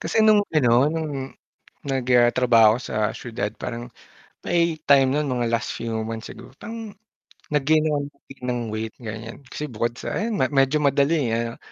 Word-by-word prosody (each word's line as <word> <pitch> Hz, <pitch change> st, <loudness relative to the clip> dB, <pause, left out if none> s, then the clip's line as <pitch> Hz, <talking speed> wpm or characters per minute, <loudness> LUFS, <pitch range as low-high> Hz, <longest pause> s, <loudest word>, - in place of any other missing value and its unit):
Kasi 220 Hz, -, +1 dB
nung 215 Hz, -1 st, +6 dB
ano 125 Hz, -3 st, +4 dB
nung, 145 Hz, -5 st, -4 dB, 0.5 s
nag 135 Hz, -2 st, -1 dB
ah, 120 Hz, 0 st, +6 dB
trabaho 115 Hz, -3 st, +5 dB
ako -, -, -6 dB
sa -, -, -6 dB, 0.2 s
siyudad 110 Hz, -3 st, -4 dB
parang 120 Hz, +1 st, -6 dB, 0.5 s
may 170 Hz, -2 st, +1 dB
time 135 Hz, -2 st, +5 dB
no'n 150 Hz, 0 st, 0 dB
mga 120 Hz, -2 st, -1 dB
last 115 Hz, 0 st, -1 dB
few 115 Hz, 0 st, -4 dB, 0.2 s
months 110 Hz, -1 st, -6 dB
siguro 130 Hz, -, -13 dB
parang, 225 Hz, -1 st, -8 dB, 0.6 s
nag-gain 155 Hz, +2 st, +3 dB
ako 150 Hz, -2 st, +1 dB
ng 145 Hz, -, -9 dB
nag-gain 135 Hz, -1 st, -17 dB
ng 125 Hz, -1 st, -1 dB
weight 110 Hz, 0 st, -4 dB
ganiyan. 115 Hz, +1 st, -7 dB
Kasi 150 Hz, +3 st, -6 dB
bukod 115 Hz, 0 st, -2 dB
sa -, -, -4 dB
ayan 215 Hz, -1 st, -1 dB
ma -, -, +4 dB
medyo 135 Hz, +2 st, +3 dB
madali, 140 Hz, 0 st, +2 dB
ah, 115 Hz, 0 st, -3 dB
135 Hz, 180 wpm, -23 LUFS, 115-150 Hz, 0.6 s, nung